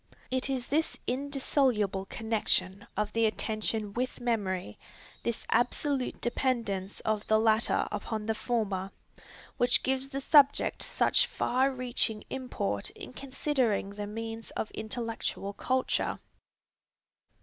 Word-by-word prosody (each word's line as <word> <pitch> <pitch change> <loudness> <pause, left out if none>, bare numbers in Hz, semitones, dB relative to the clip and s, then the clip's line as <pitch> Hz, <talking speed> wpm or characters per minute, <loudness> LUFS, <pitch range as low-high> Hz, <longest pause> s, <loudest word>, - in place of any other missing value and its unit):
It 260 +1 0
is 260 -3 -1
this 310 +4 0
indissoluble 255 -7 +1
connection 210 -3 0
of 210 0 0
the 230 0 +4
attention 215 -1 -1
with 250 +3 -2
memory, 195 - -1 0.4
this 235 -1 -2
absolute 255 +3 +1
dependence 230 -6 -1
of 215 -1 -1
the 220 - +5
latter 220 +1 +3
upon 215 -2 -3
the 220 - +1
former, 210 -5 -1 0.7
which 245 0 +3
gives 265 +1 0
the 275 0 -3
subject 285 0 +5
such - - +3
far 260 +2 +1
reaching 245 -4 -1
import 100 - -2
in - - -10
considering 260 -7 0
the 205 0 -5
means 225 +1 -5
of 215 - -2
intellectual 225 -3 -3
culture. 260 +4 0
230 Hz, 115 wpm, -30 LUFS, 210-260 Hz, 0.7 s, the